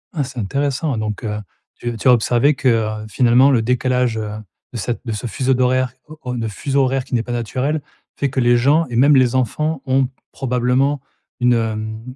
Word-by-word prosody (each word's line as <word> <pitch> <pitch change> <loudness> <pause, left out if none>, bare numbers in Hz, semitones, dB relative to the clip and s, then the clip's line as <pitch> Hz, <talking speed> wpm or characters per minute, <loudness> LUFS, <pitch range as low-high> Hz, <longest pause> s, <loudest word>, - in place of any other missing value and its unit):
Ah, 150 - 0
c'est 130 -1 -7
intéressant. 140 +6 -1
Donc, 105 0 -3
heu, 105 -1 -3 0.4
tu 120 -1 -5
tu 120 - -1
as 125 - +8
observé 120 +4 +3
que, 135 -1 -2 0.4
heu, - - -8
finalement 125 +5 +4
le 125 -5 +3
décalage, 125 -1 +1
heu, 110 -1 -3 0.4
de 120 - -6
cet 115 +2 -3
de 115 - -3
ce 105 +3 -4
fuseau 130 +2 0
d'horaire 130 -1 +1
o 155 0 -12
o 125 0 -4
de 115 -2 -2
fuseau 135 +6 0
horaire 130 0 0
qui 125 - -4
n'est 115 - +1
pas 120 - -7
naturel 130 +6 -1 0.3
fait 140 - -1
que 130 - -2
les 120 -1 +4
gens 145 +7 +3
et 120 - -5
même 140 +5 +5
les 130 -2 +4
enfants 145 +5 -1
ont 130 0 +2 0.2
probablement 130 +2 0 0.4
une, 125 0 +4
hem, 110 +2 -3
125 Hz, 205 wpm, -19 LUFS, 115-135 Hz, 0.4 s, as